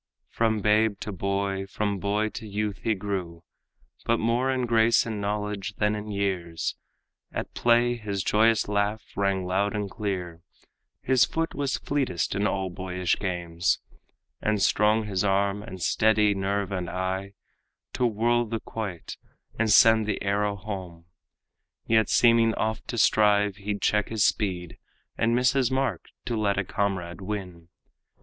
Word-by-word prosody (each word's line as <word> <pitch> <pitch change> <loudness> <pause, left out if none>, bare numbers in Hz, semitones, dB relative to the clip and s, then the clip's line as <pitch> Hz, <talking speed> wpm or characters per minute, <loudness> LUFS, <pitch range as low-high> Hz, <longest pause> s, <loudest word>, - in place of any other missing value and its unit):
From 110 -2 +1
babe 105 0 +2
to 110 - -4
boy, 100 +1 -2
from 100 0 -2
boy 105 +3 0
to 110 0 -8
youth 105 -1 -3
he 110 - 0
grew, 95 -4 -4 0.6
But 115 - +2
more 120 +4 +1
in 130 -1 0
grace 115 0 +4
and 110 -3 -4
knowledge 105 -1 -3
than 105 0 +1
in 105 0 -5
years. 95 -5 -2 0.6
At - - -5
play 120 0 +3
his 100 -4 -3
joyous 110 +2 +3
laugh 105 +1 0
rang 100 -2 0
loud 100 +3 0
and 105 -2 -3
clear, 90 -6 -4 0.6
His 130 -1 +4
foot 165 0 -2
was 140 -1 -1
fleetest 135 - -1
in 100 +1 +1
all 95 -1 -2
boyish 90 -1 -1
games, 85 -3 -1 0.6
And 105 -1 +1
strong 105 +2 +3
his 100 -3 -1
arm, 100 0 +1
and 95 -3 -9
steady 105 +2 +3
nerve 100 0 -2
and 90 -2 -3
eye, 95 +2 -3 0.6
To 125 - +2
whirl 120 +2 +1
the 115 +1 -3
quoit 105 -6 -6 0.4
and 115 -2 +2
send 110 0 +6
the 105 - -1
arrow 100 +1 0
home; 95 -4 -7 0.8
Yet 110 -1 +3
seeming 115 -1 +4
oft 110 0 -2
to 120 - -4
strive, 105 -2 +3
he'd 100 0 -4
check 105 0 +2
his 110 -2 +1
speed 90 -6 -1 0.4
And 115 +1 +1
miss 125 0 +4
his 135 -3 +2
mark 135 0 -1 0.2
to 120 - -2
let 105 -2 0
a 95 - +1
comrade 95 -3 -2
win. 95 -4 -6
105 Hz, 155 wpm, -26 LUFS, 95-110 Hz, 0.8 s, send